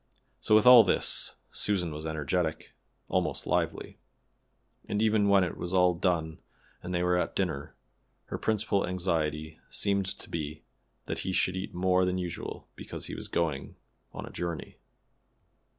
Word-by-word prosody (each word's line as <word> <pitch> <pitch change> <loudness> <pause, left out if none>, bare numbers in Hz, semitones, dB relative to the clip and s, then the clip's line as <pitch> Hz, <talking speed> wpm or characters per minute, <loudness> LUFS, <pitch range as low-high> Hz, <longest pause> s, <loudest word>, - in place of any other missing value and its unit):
So 105 - +3
with 110 - +5
all 125 -2 +10
this 95 - +2 0.2
Susan 90 -6 0
was 75 +1 -6
energetic, 80 +2 -2 0.3
almost - - -1
lively; - - -1 0.9
and 105 - 0
even 110 -2 +3
when 100 -1 +5
it 90 - -2
was 90 +2 -3
all 90 -1 +5
done 85 -3 -1 0.4
and 90 - -6
they 90 -1 0
were 90 0 +2
at - - -2
dinner, 80 -7 -2 0.5
her - - -5
principal 105 -3 +1
anxiety 80 -4 -2
seemed 100 -2 +1
to - - -7
be 75 -1 -5 0.4
that - - -4
he 95 - -3
should 90 0 +1
eat 95 -1 -5
more 90 +1 +3
than 90 0 0
usual 90 -2 -5
because - - -7
he - - -7
was - - -6
going 80 -5 -2 0.4
a - - -8
journey. 85 -4 -5
90 Hz, 150 wpm, -29 LUFS, 80-95 Hz, 0.9 s, all